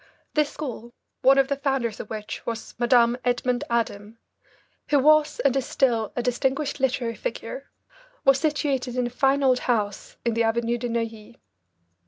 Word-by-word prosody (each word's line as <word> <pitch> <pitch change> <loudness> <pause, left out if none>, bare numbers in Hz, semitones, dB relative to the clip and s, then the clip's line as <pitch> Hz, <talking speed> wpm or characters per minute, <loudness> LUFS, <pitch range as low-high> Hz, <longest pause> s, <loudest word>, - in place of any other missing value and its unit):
This 300 -1 +2
school, 240 -5 -7 0.3
one 270 +1 +6
of 270 -1 +4
the 280 - -1
founders 270 -6 -1
of - - -7
which 215 -1 -6
was 230 -1 -5
Madame 240 0 +4
Edmond 245 0 0
Adam, 225 -2 -2 0.7
who 290 - +3
was 305 +2 +4
and 275 -2 +2
is 270 -2 -1
still 230 -5 +1
a 245 - -1
distinguished 265 +4 -1
literary 250 -3 0
figure, - - -6 0.6
was 275 0 +5
situated 280 -5 -1
in 250 -1 0
a 240 - -4
fine 270 +2 +2
old 255 -2 +4
house 210 -5 -2
in 235 - +1
the 230 - 0
Avenue 235 +1 +1
de 245 0 -3
Neuilly. 230 -1 -4
250 Hz, 165 wpm, -25 LUFS, 235-275 Hz, 0.7 s, one